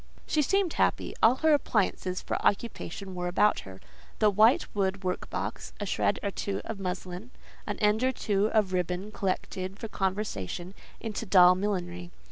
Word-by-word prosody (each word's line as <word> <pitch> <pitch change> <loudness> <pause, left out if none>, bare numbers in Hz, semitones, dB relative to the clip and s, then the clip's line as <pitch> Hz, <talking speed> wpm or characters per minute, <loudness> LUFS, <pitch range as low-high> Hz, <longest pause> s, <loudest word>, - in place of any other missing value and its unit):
She 305 - +1
seemed 390 +4 +1
happy; - - +1
all 230 +3 +6
her 315 - +6
appliances 195 -8 0
for - - -3
occupation 200 -3 -1
were 180 0 -3
about 200 +4 +3
her; 95 -1 -10 0.4
the 210 -1 +4
white 220 +5 +5
wood 195 -1 0
workbox, 180 0 -4
a - - -2
shred - - +1
or 200 - -1
two 195 0 -3
of 220 -3 -5
muslin, 185 +3 -5 0.4
an - - -3
end 210 +2 +2
or 260 - +3
two 210 -4 0
of 210 -4 +1
ribbon 180 +3 -2
collected 185 -1 -3
for 225 - -5
conversion 190 - -3 0.3
into 225 0 -5
doll 180 -2 +7
millinery. 180 -2 -3
195 Hz, 160 wpm, -28 LUFS, 180-215 Hz, 0.4 s, doll